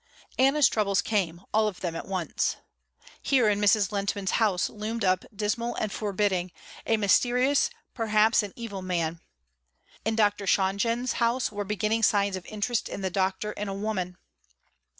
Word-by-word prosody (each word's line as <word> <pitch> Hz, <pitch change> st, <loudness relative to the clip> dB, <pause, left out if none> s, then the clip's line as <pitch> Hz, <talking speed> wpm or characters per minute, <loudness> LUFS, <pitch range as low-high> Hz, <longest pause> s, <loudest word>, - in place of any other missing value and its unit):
Anna's 275 Hz, +2 st, +5 dB
troubles 200 Hz, -3 st, +1 dB
came 180 Hz, -5 st, -1 dB
all 215 Hz, 0 st, +3 dB
of 200 Hz, -4 st, -5 dB
them 170 Hz, -3 st, -3 dB
at -, -, -6 dB
once. 185 Hz, -3 st, -1 dB, 0.7 s
Here 255 Hz, -5 st, +3 dB
in 205 Hz, 0 st, +1 dB
Mrs. 205 Hz, -1 st, +3 dB
Lehntman's 200 Hz, -1 st, -1 dB
house 195 Hz, -6 st, +2 dB
loomed 220 Hz, +1 st, -4 dB
up 185 Hz, 0 st, +2 dB
dismal 220 Hz, +3 st, -2 dB
and 215 Hz, -, -2 dB
forbidding, 195 Hz, -4 st, -1 dB, 0.4 s
a 225 Hz, -, +3 dB
mysterious, 250 Hz, +6 st, +3 dB, 0.2 s
perhaps 220 Hz, -1 st, +3 dB
an 205 Hz, -2 st, -6 dB
evil 215 Hz, -5 st, -6 dB
man. 170 Hz, -3 st, -2 dB, 0.8 s
In 220 Hz, +1 st, 0 dB
Dr. 205 Hz, -2 st, +1 dB
Shonjen's 230 Hz, +7 st, +1 dB
house 235 Hz, +1 st, +1 dB
were 205 Hz, -1 st, -4 dB
beginning 215 Hz, +2 st, 0 dB
signs 200 Hz, -3 st, +3 dB
of 185 Hz, -, -8 dB
interest 215 Hz, +2 st, -2 dB
in -, -, -6 dB
the 190 Hz, -1 st, -2 dB
doctor 190 Hz, +3 st, -1 dB
in 210 Hz, 0 st, -5 dB
a 195 Hz, -, -4 dB
woman. 195 Hz, -3 st, -3 dB
205 Hz, 155 wpm, -27 LUFS, 190-225 Hz, 0.8 s, Anna's